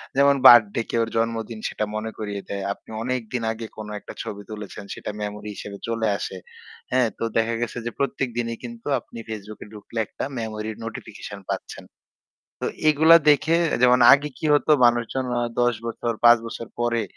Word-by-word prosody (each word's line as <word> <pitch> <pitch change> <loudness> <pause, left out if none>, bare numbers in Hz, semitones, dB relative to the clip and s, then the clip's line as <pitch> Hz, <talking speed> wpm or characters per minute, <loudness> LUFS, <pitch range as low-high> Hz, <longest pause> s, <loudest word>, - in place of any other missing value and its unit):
যেমন 140 +1 +5
বার্থডে 115 -3 +8
কেউ 115 - +1
এর - - -10
জন্মদিন 115 0 -2
সেটা 105 - -2
মনে 110 +1 -3
করিয়ে 105 -2 -4
দেয়। 100 -1 -3
আপনি - - -24
অনেকদিন 125 -1 -3
আগে 115 0 -6
কোন 110 -1 -7
একটা - - -10
ছবি 100 0 -6
তুলেছেন 105 -1 -8
সেটা - - -6
মেমোরি 105 0 -5
হিসেবে 100 0 -7
চলে 115 -1 0
আসে। 95 - -5 0.5
হ্যাঁ, 125 -2 +3
তো - - -2
দেখা 115 +1 +1
গেছে 120 - -3
যে 120 - -2
প্রত্যেক 135 -1 -1
দিনই 115 -1 -1
কিন্তু 235 -1 -8
আপনি 115 - -14
Facebook 110 -1 -7
এ - - -14
ঢুকলে 105 +2 -7
একটা - - -7 0.2
মেমোরি 110 -1 -4 0.2
নোটিফিকেশন 105 -3 -8
পাচ্ছেন। - - -5 0.8
তো - - -2 0.2
এগুলা 160 +2 +7
দেখে 160 +3 +3 0.3
যেমন 125 0 +6
আগে 145 +2 +4
কি - - -2
হতো 145 - +1 0.2
মানুষজন 120 +2 0
অ - - +1 0.2
১০ 120 0 +3
বছর 115 0 -2
৫ 120 0 +9
বছর 115 0 -6
পরে 120 -1 +1
115 Hz, 180 wpm, -24 LUFS, 110-125 Hz, 0.8 s, ৫